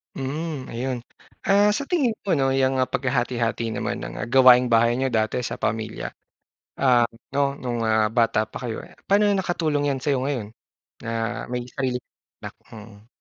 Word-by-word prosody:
Mhm, 145 +1 -4
ayun. 125 +2 -2 0.5
Ah, 200 +1 +5
sa 280 - -3
tingin 280 -10 +2
mo 195 - -1
'no, 135 - +2
'yang 130 0 +3 0.2
paghati-hati 120 -3 0
naman - - -2
ng - - -7 0.2
gawaing-bahay 125 -3 +6
niyo, 135 +1 0
dati 110 0 0
sa - - -4
pamilya, 110 0 -2 0.7
ah, 125 -3 +5 0.3
'no, - - +2 0.2
nung 120 -2 -2 0.4
bata 115 -2 +3
pa - - -6
kayo 115 -2 -3
eh, - - -19
paano 205 +2 +4
nakatulong 160 -6 0
'yan 135 - -2
sa'yo 140 0 0
ngayon 130 -7 -2 0.6
na 115 - -4 0.4
may 125 0 -1
sarili 125 -1 -2 0.4
nak? - - -7 0.2
Mm. 105 0 -13
130 Hz, 150 wpm, -24 LUFS, 115-145 Hz, 0.7 s, gawaing-bahay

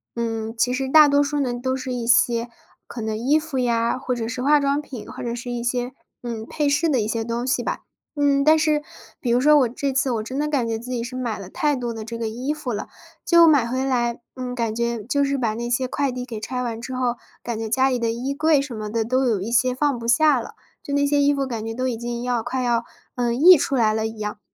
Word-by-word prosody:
嗯， 225 -1 -3
其 250 +2 +2
实 265 0 -2
大 305 +1 +8
多 285 0 +4
数 290 0 -1
呢， 250 -3 0
都 260 +2 -2
是 260 -1 -4
一 240 -2 -3
些 240 -1 +3 0.4
可 235 - -7
能 220 0 -2
衣 265 +8 +2
服 310 -4 -3
呀， 235 -1 +1
或 255 -1 -2
者 225 -1 -3
是 250 +2 -4
化 290 +3 +4
妆 280 +1 +1
品， 255 -6 -9
或 - - -8
者 235 0 -3
是 245 +1 -6
一 240 -1 -3
些， 245 +1 -1 0.3
嗯， 225 -2 -5
配 295 -2 -1
饰 290 +4 +2
的 270 -5 +2
一 210 - -1
些 225 0 -2
东 235 +2 -3
西 265 - +1
吧。 - - -3 0.4
嗯， 280 -1 +3
但 310 +2 +6
是 310 -1 +2 0.4
比 245 - -3
如 240 - +3
说 300 +3 +6
我 250 - +2
这 270 +3 -2
次 265 0 +1
我 225 -3 -1
真 260 +5 -5
的 300 - 0
感 275 -6 0
觉 225 -1 -2
自 240 - -10
己 245 -2 -2
是 255 +1 -7
买 240 -4 -3
了 195 -2 -9
太 295 -1 +1
多 240 -2 -3
的 225 -1 -6
这 230 +1 -6
个 230 - -2
衣 250 +6 -3
服 290 -6 -4
了， 210 - -4 0.4
就 340 -1 +6
买 285 -7 +4
回 260 +2 -1
来， 240 -3 0 0.2
嗯， 250 -1 -5
感 230 -3 -1
觉 235 -1 -2
就 280 +6 +1
是 280 0 0
把 230 -4 0
那 235 +2 -4
些 255 +1 0
快 280 +1 -1
递 250 0 -5
给 230 -4 -6
拆 250 +3 -3
完 230 -2 -4
之 260 +1 -6
后， 245 -1 0 0.3
感 235 -2 -4
觉 225 - -4
家 265 +3 +2
里 250 - 0
的 230 -1 0
衣 245 +4 -2
柜 305 0 +3
什 275 -3 -4
么 215 -1 -5
的 225 0 0
都 255 +3 +1
有 225 -5 +1
一 210 +5 -4
些 250 +1 +2
放 280 -2 0
不 230 - -6
下 275 +3 +4
了， 230 - -8 0.3
就 285 - -4
那 285 - +2
些 285 0 +2
衣 285 0 +4
服 275 -1 0
感 230 -4 -4
觉 225 0 -5
都 255 +1 -1
已 240 - -1
经 235 +1 -5
要 245 -2 0
快 250 +2 -3
要， 235 -1 +1 0.3
嗯， 240 0 -1
溢 360 +5 +9
出 280 -2 0
来 220 -4 +3
了 220 0 -1
一 220 0 -9
样。 210 -1 -5
245 Hz, 295 characters per minute, -22 LUFS, 230-275 Hz, 0.4 s, 溢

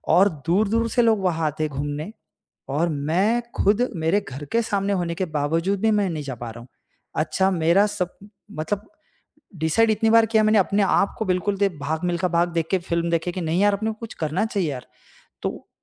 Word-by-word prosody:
और 195 +3 +6 0.2
दूर-दूर 215 +6 +2
से 240 - +2
लोग 225 -2 +3
वहाँ 165 -3 0
आते 155 +1 -2
हैं 155 - -2
घूमने। 145 +7 -3 0.6
और 165 +4 +1
मैं 170 +11 +1 0.2
ख़ुद 215 +5 +3
मेरे 165 +4 +2
घर 135 +3 -7
के 230 - +3
सामने 200 -2 -1
होने 170 -3 -1
के 185 - -1
बावजूद 165 +7 0
भी 225 - +3
मैं 205 -3 +2
नहीं 155 -3 -4
जा 135 -2 -5
पा 120 0 -7
रहा 120 - -10
हूँ। 120 - -14 0.6
अच्छा 190 +4 +1
मेरा 170 +3 +3
सब 180 -3 -4 0.4
मतलब 200 +7 -3 0.7
डीसाइड 165 +9 +3
इतनी 220 +1 +2
बार 230 0 +6
किया 220 0 +3
मैंने 215 0 +4
अपने 200 +2 +2
आप 195 - +2
को 220 - -2
बिल्कुल 190 +2 0
दे, 200 0 +2
"भाग 155 -1 -4
मिलखा 175 +1 0
भाग" 170 0 +2
देख 165 -1 0
के 190 - +4
फ़िल्म 170 0 -2
देखे 170 +1 0
कि 185 - -5
नहीं 165 +3 0
यार 205 0 +4
अपने 215 +2 -1
को 220 - -10
कुछ 230 - -7
करना 155 +7 0
चाहिए 200 -7 -1
यार। 125 -2 -7 0.6
तो - - -4
180 Hz, 210 wpm, -23 LUFS, 160-205 Hz, 0.7 s, और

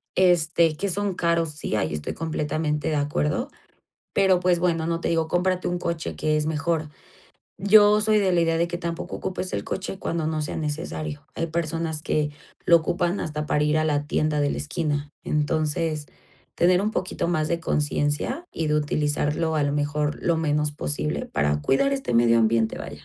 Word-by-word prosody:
este, 170 -3 +3
que 200 - -1
son 200 +1 -1
caros, 170 -2 +1
sí, 150 -7 -4
ahí 80 -7 -1
estoy 75 -1 -4
completamente 155 -1 -2
de 155 - 0
acuerdo, 150 - 0 0.6
pero, 190 -2 +4
pues, 180 -1 +2
bueno, 165 -2 +1
no 170 0 -1
te - - -1
digo, 165 -1 +1
cómprate 180 +2 0
un 175 - -1
coche 170 -2 -3
que 155 0 +1
es 150 - 0
mejor. 155 0 -1 0.7
Yo 205 +1 +6
soy 215 0 +3
de 190 -3 +2
la 175 - +3
idea 165 0 +2
de 170 - +2
que 175 0 -4
tampoco 170 -1 -4
ocupes 185 0 -4
el - - -2
coche 195 0 -4
cuando 165 -2 -2
no 155 -1 -1
sea 150 - -4
necesario, 155 -1 -4
hay 165 - -1
personas 160 -1 -2
que 150 -1 0 0.4
lo 170 - +8
ocupan 175 +3 -1
hasta 150 -1 -3
para 150 - +1
ir 150 +1 +2
a 155 - +1
la 145 -1 0
tienda 155 -1 +1
de 145 0 +2
la - - -2
esquina. 145 -1 -2
Entonces, 155 0 0 0.5
tener 180 +2 +4
un 210 - 0
poquito 185 -3 -2
más 155 -3 +1
de 170 0 -1
conciencia 145 - -1
y 165 - -2
de 150 - +2
utilizarlo, 150 +1 0
a 150 - +2
lo 145 0 0
mejor, 145 0 -1
lo 170 -1 +2
menos 150 -2 0
posible 75 - -1
para 75 +1 0
cuidar 205 - +2
este 270 - -2
medio 115 0 +5
ambiente, 115 0 +2
vaya. - - -9
155 Hz, 190 wpm, -24 LUFS, 150-170 Hz, 0.7 s, lo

